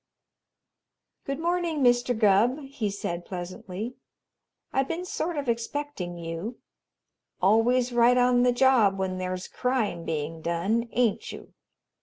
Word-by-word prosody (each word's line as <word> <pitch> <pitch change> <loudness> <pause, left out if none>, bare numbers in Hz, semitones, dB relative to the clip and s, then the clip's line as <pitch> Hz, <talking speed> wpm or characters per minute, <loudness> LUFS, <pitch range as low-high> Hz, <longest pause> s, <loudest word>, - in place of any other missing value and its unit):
"Good 275 0 -2
morning, 340 -2 0
Mr. 245 -1 +3
Gubb," 215 +4 +4
he 270 -6 -3
said 175 -3 -4
pleasantly. 185 +6 -6 0.8
"I 270 - +3
been 335 +6 -3
sort 345 -2 -3
of 280 -2 -3
expecting 235 -5 -3
you. 170 +8 -5 0.8
Always 240 +5 +3
right 240 +1 +5
on 245 0 +4
the 250 0 +4
job 245 -6 +4
when 185 -1 -2
there's 185 0 -3
crime 250 -9 -1
being 160 0 -3
done, 195 +9 0
ain't 240 -4 +1
you? - - -11
235 Hz, 125 wpm, -27 LUFS, 185-255 Hz, 0.8 s, right